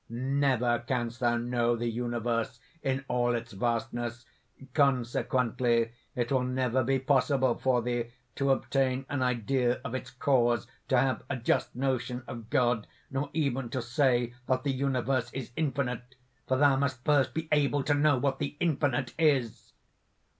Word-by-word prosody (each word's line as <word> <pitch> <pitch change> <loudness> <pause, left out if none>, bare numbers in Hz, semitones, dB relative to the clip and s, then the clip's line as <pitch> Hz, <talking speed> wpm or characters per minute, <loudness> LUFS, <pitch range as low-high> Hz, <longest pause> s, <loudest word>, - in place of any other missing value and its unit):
"Never 125 -1 +1
canst 120 -2 -2
thou 120 -2 +2
know 120 0 +1
the 120 +1 -2
universe 115 0 -2 0.2
in 135 0 -1
all 120 -1 +1
its 115 0 -5
vastness; 120 +2 -2 0.5
consequently 120 -3 +1 0.2
it 120 0 -1
will 130 -2 +3
never 130 0 0
be 135 +2 +2
possible 130 -1 +2
for 125 -2 +1
thee 120 -1 -2 0.2
to 140 +3 0
obtain 135 -1 +1
an 145 -2 -1
idea 125 0 +1
of 130 - -4
its 130 0 -4
cause, 125 -3 +2 0.2
to 130 - +3
have 130 +1 +2
a 140 - -1
just 120 - 0
notion 125 -1 -1
of 115 -2 -8
God, 120 -3 +2 0.2
nor 135 +2 -2
even 135 -5 -1
to 130 - -2
say 120 0 +1
that 130 0 +1
the 140 - +1
universe 130 -2 0
is 135 -3 -5
infinite, 135 -4 -2 0.3
for 130 - +2
thou 140 0 +5
must 130 -2 -2
first 140 -4 +3
be 160 0 -2
able 145 -1 +2
to 145 - +2
know 145 -1 +3
what 135 +1 0
the 145 0 -3
Infinite 145 -6 0
is!" 140 -8 +1
130 Hz, 155 wpm, -29 LUFS, 120-135 Hz, 0.5 s, thou